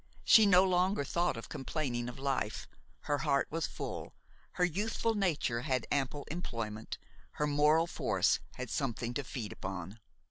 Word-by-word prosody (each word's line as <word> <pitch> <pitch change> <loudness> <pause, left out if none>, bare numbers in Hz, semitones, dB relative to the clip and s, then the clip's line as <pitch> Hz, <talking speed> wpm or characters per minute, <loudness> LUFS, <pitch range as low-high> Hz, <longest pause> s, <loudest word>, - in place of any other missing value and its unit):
She 220 -2 +7
no 185 -1 +7
longer 185 -2 +2
thought 170 -1 0
of 115 - -7
complaining 125 -4 -3
of 120 - -9
life; 135 -5 -2 0.3
her 145 -1 -1
heart 140 -3 +2
was 165 +1 -1
full, - - -6 0.4
her 180 - +2
youthful 215 +6 0
nature 160 - 0
had 130 -3 0
ample 140 +1 0
employment, 115 -10 -4 0.4
her 150 - 0
moral 150 +2 +4
force 170 - +1 0.2
had 130 -2 -6
something 120 -4 -2
to 145 - -2
feed 120 -4 -5
upon. 95 +2 -6
145 Hz, 150 wpm, -33 LUFS, 120-170 Hz, 0.4 s, She